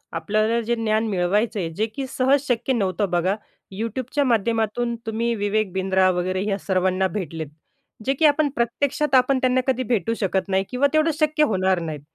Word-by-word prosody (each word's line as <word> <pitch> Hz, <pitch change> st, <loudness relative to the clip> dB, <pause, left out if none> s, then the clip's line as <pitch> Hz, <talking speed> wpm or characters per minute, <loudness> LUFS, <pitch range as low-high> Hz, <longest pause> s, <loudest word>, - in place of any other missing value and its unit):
आपल्याला 215 Hz, +7 st, +1 dB
जे 235 Hz, +1 st, -1 dB
ज्ञान 220 Hz, -1 st, 0 dB
मिळवायचं 205 Hz, +3 st, 0 dB
आहे, 170 Hz, -3 st, -2 dB
जे 205 Hz, +7 st, -1 dB
की 275 Hz, -1 st, -3 dB
सहज 265 Hz, +2 st, +2 dB
शक्य 245 Hz, +2 st, 0 dB
नव्हतं 195 Hz, -2 st, 0 dB
बघा.YouTubeच्या 215 Hz, -, -2 dB
माध्यमातून 230 Hz, 0 st, 0 dB
तुम्ही 230 Hz, +1 st, -1 dB
विवेक 205 Hz, -1 st, -1 dB
बिंद्रा 190 Hz, 0 st, +2 dB
वगैरे 185 Hz, +2 st, -1 dB
या 195 Hz, -, 0 dB
सर्वांना 185 Hz, 0 st, +1 dB
भेटलेत. 160 Hz, -4 st, -5 dB, 0.6 s
जे 270 Hz, -, +2 dB
की 310 Hz, +4 st, +1 dB
आपण 295 Hz, 0 st, +4 dB
प्रत्यक्षात 270 Hz, +4 st, 0 dB
आपण 260 Hz, +1 st, +4 dB
त्यांना 255 Hz, 0 st, +2 dB
कधी 255 Hz, -1 st, +1 dB
भेटू 225 Hz, +1 st, 0 dB
शकत 195 Hz, 0 st, 0 dB
नाही 190 Hz, 0 st, +2 dB
किंवा 260 Hz, +3 st, +2 dB
तेवढं 310 Hz, +1 st, +3 dB
शक्य 305 Hz, 0 st, +2 dB
होणार 190 Hz, -7 st, +1 dB
नाहीत, 155 Hz, -3 st, -5 dB
220 Hz, 170 wpm, -23 LUFS, 190-255 Hz, 0.6 s, आपण